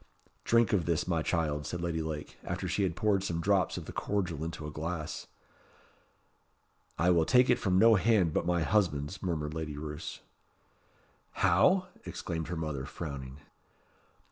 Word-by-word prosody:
"Drink 115 -1 +3
of 90 -5 +1
this, 85 -1 0
my 85 -3 +1
child," 75 -3 -1
said 90 - -4
Lady 85 -2 -1
Lake, 80 -1 -5
after 90 +2 -3
she 95 +4 0
had 90 -4 0
poured 100 +1 +1
some 85 -4 -2
drops 95 0 +2
of - - -6
the - - -7
cordial 90 -7 -2
into 80 -2 -5
a 75 - -5
glass. 80 +1 -4 1.7
"I 90 +1 +3
will 85 -2 +4
take 125 +7 +5
it 125 - +3
from 95 -6 +1
no 115 +3 +7
hand 100 -5 +3
but - - 0
my 85 -2 +2
husband's," 85 -4 0
murmured 75 -5 -2
Lady 80 -2 -4
Roos. 75 +1 -6 1.1
"How?" 115 - +3
exclaimed 80 -2 -4
her 90 - -3
mother, 75 -4 -3
frowning. 70 -3 -7
85 Hz, 160 wpm, -31 LUFS, 80-95 Hz, 1.7 s, no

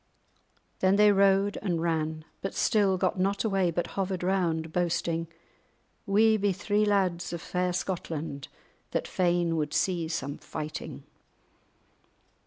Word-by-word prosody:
Then 190 +1 +4
they 210 0 +6
rode 195 0 +3
and 175 -5 -1
ran, 160 -1 -1 0.2
but 195 - -4
still 200 -3 +2
got 185 0 0
not 195 +2 +1
away, 195 -5 +1
but 170 +1 -1
hovered 190 -2 -2
round, 165 -4 0
boasting: 170 -1 0 0.8
"We 220 +2 +4
be 205 -1 +1
three 205 +2 +1
lads 185 -5 +1
of 170 - -3
fair 180 +2 -1
Scotland 165 -6 -4 0.4
that - - -2
fain 175 -2 +1
would 150 -1 -2
see 175 -4 +1
some 140 -3 -4
fighting." 155 0 -6
180 Hz, 130 wpm, -28 LUFS, 165-195 Hz, 0.8 s, they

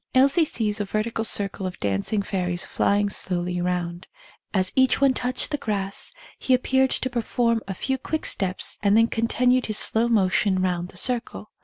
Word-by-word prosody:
Elsie 275 +5 +5
sees 215 -6 -1
a - - -1
vertical 215 +3 -2
circle 200 -3 0
of 185 - -8
dancing 100 - -1
fairies 180 -3 -2
flying 205 0 +1
slowly 180 -2 -2
round; 175 0 -3 0.4
as 185 -2 +1
each 260 -1 +3
one 275 -1 +4
touched 250 +2 -2
the 295 - -1
grass 200 -5 -2 0.3
he 260 - +3
appeared 265 +1 +2
to 260 - -1
perform 235 -1 0
a 190 - -4
few 265 +7 -2
quick 315 +4 -3
steps 190 -1 -1
and 205 +1 +3
then 225 - +6
continued 245 +2 +1
his 215 -1 0
slow 225 +2 +3
motion 195 -3 +2
round 180 -1 -1
the 180 - -13
circle. 235 -2 -2
210 Hz, 175 wpm, -24 LUFS, 185-250 Hz, 0.4 s, then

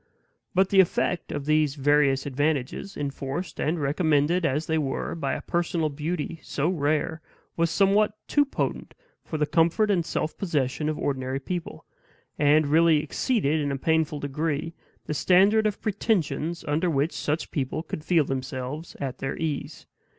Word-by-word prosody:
But 190 +1 +4
the 195 - +4
effect 180 -1 +2
of 145 -1 -4
these 155 -2 +2
various 145 -1 +3
advantages, 145 +6 -2
enforced 140 +4 -4
and 160 +3 0
recommended 155 +3 +2
as 150 +4 -1
they 160 0 0
were 135 -3 -2
by 145 -5 -2
a - - -4
personal 170 -2 0
beauty 155 +2 -4
so 150 +4 -1
rare, 155 -1 0 0.3
was 170 0 +1
somewhat 205 +4 +3
too 290 - +4
potent 280 - -3 0.3
for 155 - -4
the 150 - +2
comfort 170 +7 +2
and 180 -4 +2
self 160 -1 -2
possession 150 -4 -1
of 155 - -2
ordinary 130 -1 -2
people; 175 +4 -5 0.5
and 150 +1 +4
really 155 +1 +4
exceeded 160 - 0
in 145 -1 -1
a 135 - -2
painful 160 0 +1
degree 150 +3 -2 0.3
the - - -3
standard 200 +7 +4
of 210 - -3
pretensions 175 -6 -1
under 160 +5 +1
which 150 +1 +1
such 150 +3 -2
people 145 +2 -2
could 155 -1 -6
feel 165 -3 +3
themselves 135 +3 -5
at 130 -2 -4
their 135 - -3
ease. 155 -3 -4
155 Hz, 160 wpm, -26 LUFS, 145-170 Hz, 0.5 s, But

